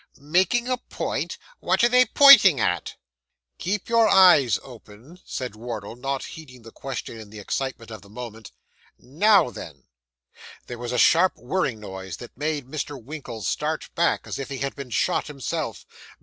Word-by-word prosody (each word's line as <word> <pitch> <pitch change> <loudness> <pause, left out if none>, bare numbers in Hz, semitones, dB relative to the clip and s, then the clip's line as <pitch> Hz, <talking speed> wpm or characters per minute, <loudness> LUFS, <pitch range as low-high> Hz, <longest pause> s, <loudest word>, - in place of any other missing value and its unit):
'Making 185 - +1
a 255 0 0
point! 245 - -4 0.2
What - - +1
are - - +7
they 250 +1 +4
pointing 235 - +8
at?' 90 -5 -1 0.6
'Keep 195 +2 -3
your 230 -1 +4
eyes 175 - +6
open,' 125 +6 -15
said 125 -5 -5
Wardle, 110 -2 -7
not 135 +2 -3
heeding 130 -7 -12
the 115 - -12
question 125 -3 -7
in 110 -2 -11
the 110 - -12
excitement 115 +2 -4
of 110 - -9
the 100 - -18
moment. 110 -1 -9 0.5
'Now 165 - +3
then.' 70 - -10 0.8
There 120 -1 -8
was 120 -1 -5
a 125 - -1
sharp 175 +8 +4
whirring 125 -3 -2
noise, 95 -3 -8
that 120 - -12
made 150 0 -3
Mr. 145 0 -5
Winkle 125 -4 -8
start - - -3
back - - 0
as - - -6
if 135 - -5
he 135 - -5
had 135 +2 -3
been 140 -3 -8
shot 175 +9 0
himself. 140 -4 -5
135 Hz, 165 wpm, -24 LUFS, 115-170 Hz, 0.8 s, pointing